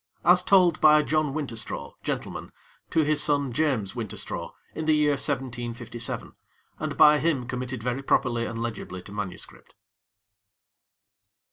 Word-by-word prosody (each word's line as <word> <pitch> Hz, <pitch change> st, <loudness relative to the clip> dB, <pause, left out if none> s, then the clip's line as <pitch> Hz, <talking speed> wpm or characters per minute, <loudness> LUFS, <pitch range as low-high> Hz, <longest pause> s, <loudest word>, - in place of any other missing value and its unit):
As 180 Hz, +1 st, +6 dB
told 180 Hz, -3 st, +4 dB
by 150 Hz, 0 st, +7 dB
John 155 Hz, -2 st, +1 dB
Winterstraw, 135 Hz, -6 st, -4 dB
Gent., -, -, -2 dB, 0.6 s
to 160 Hz, -, +3 dB
his 150 Hz, 0 st, +2 dB
son 140 Hz, -4 st, +1 dB
James 125 Hz, -9 st, 0 dB
Winterstraw, 115 Hz, -5 st, -5 dB, 0.2 s
in 160 Hz, -, -4 dB
the 155 Hz, 0 st, +4 dB
year 150 Hz, -1 st, +3 dB
1757, 120 Hz, -4 st, -3 dB, 0.5 s
and -, -, -3 dB
by 150 Hz, 0 st, +7 dB
him 145 Hz, -7 st, 0 dB
committed 125 Hz, -2 st, -4 dB
very 125 Hz, +2 st, -1 dB
properly 120 Hz, -3 st, +1 dB
and 115 Hz, 0 st, -5 dB
legibly 95 Hz, -5 st, -5 dB
to -, -, -12 dB
manuscript. 100 Hz, -3 st, -6 dB
135 Hz, 130 wpm, -26 LUFS, 115-150 Hz, 0.6 s, by